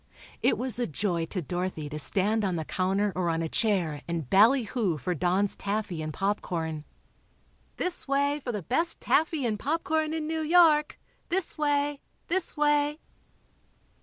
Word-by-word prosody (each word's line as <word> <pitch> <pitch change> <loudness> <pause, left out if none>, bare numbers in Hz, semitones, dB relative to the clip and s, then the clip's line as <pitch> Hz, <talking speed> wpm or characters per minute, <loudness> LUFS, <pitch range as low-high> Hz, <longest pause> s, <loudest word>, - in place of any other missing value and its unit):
It - - +3
was 250 -2 -2
a 245 - 0
joy 170 0 -1
to 185 -1 -3
Dorothy 175 -1 -3
to 150 +1 -5
stand 205 +8 +1
on 190 -3 0
the 160 -2 -3
counter 190 +3 0
or 180 -1 0
on 165 0 0
a - - -1
chair 175 -7 0
and 165 -5 -3
"ballyhoo" 220 - +3
for 150 +6 -2
Don's 185 +5 +1
taffy 200 -4 -3
and 155 0 -4
popcorn. 165 -5 -2 0.9
"This 360 -4 0
way 285 +2 +1
for 245 - -2
the 210 -5 -4
best 330 - 0
taffy 315 -4 +1
and 215 -3 -1
popcorn 315 +2 0
in 315 -1 -2
New 320 +1 -2
York! 310 -2 +4 0.3
This 365 0 0
way, 290 -1 0 0.3
this 350 -2 0
way!" 295 0 +2
210 Hz, 160 wpm, -28 LUFS, 175-295 Hz, 0.9 s, York